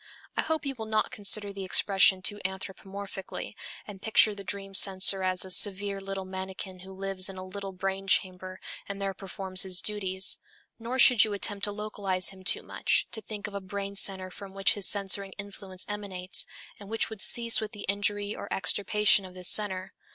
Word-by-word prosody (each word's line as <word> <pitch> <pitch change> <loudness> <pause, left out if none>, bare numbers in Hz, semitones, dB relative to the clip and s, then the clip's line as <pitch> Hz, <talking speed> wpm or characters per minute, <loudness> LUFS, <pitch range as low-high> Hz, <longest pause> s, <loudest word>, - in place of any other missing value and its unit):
I - - +1
hope 315 -2 -2
you 275 - -2
will 220 -2 -7
not 215 0 0
consider 205 0 +3
the 195 -1 -7
expression 190 0 +3
too 205 +2 -1
anthropomorphically, 190 +1 -7 0.3
and 200 -2 -11
picture 220 0 +4
the 200 -1 -8
dream 195 +1 -5
censor 195 0 +7
as 185 0 0
a 190 - -5
severe 200 0 +1
little 195 -1 -6
manikin 190 0 -7
who 190 +1 -12
lives 190 0 +2
in 190 - -9
a 185 - -7
little 195 +1 -7
brain 195 +1 -4
chamber 185 0 -1 0.3
and 200 0 -5
there 195 -1 -3
performs 190 0 -3
his 185 -1 +2
duties; 190 -2 +2 0.4
nor 235 +3 -4
should 245 -3 +6
you 215 - -1
attempt 200 0 -1
to 205 - -3
localize 200 -3 -1
him 190 -1 -12
too - - +2
much, - - 0
to 220 - -5
think 210 -2 -8
of 205 - -7
a 200 - -5
brain 200 +1 -6
center 190 -1 +2
from 195 +1 -11
which 195 0 +2
his 205 -3 0
censoring 200 -1 0
influence 195 -2 -6
emanates, 195 -3 0 0.3
and 200 -1 -12
which 225 0 -1
would 215 -3 -4
cease 235 -1 +5
with 215 - -5
the 205 -3 -7
injury 205 +1 -1
or - - -9
extirpation 205 +1 +2
of 185 -1 -12
this 180 -1 0
center. 190 -3 +1
195 Hz, 195 wpm, -28 LUFS, 190-205 Hz, 0.4 s, censor